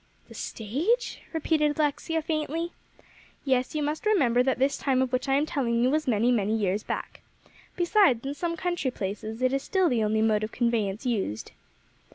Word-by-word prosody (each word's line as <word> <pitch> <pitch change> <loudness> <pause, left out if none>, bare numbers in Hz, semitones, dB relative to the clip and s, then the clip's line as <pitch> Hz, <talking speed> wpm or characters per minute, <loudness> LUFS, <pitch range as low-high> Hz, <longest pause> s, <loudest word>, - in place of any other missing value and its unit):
"The - - -11
stage?" 320 - -1
repeated 305 -2 +1
Alexia 310 +2 0
faintly. 320 +2 -2 0.7
"Yes; 260 +1 +1
you 300 - 0
must 300 +2 -2
remember 260 - +3
that 260 0 +1
this 270 +2 +2
time 265 -2 0
of 260 -1 0
which 255 +2 0
I 270 - +4
am 290 +2 +2
telling 235 -6 0
you 255 - +3
was 305 0 0
many, 235 +1 +3
many 220 -2 +1
years 200 -1 0
back. - - -5 0.5
Besides, 345 - +3
in 275 - -2
some 335 +3 -3
country 350 -7 -1
places, 215 +1 -5
it 255 +1 +2
is 275 - +1
still 375 +1 +1
the 235 -3 +1
only 215 +1 +1
mode 215 -1 +2
of 215 - -3
conveyance 230 -2 -1
used." 190 - -2
260 Hz, 185 wpm, -27 LUFS, 225-310 Hz, 0.7 s, I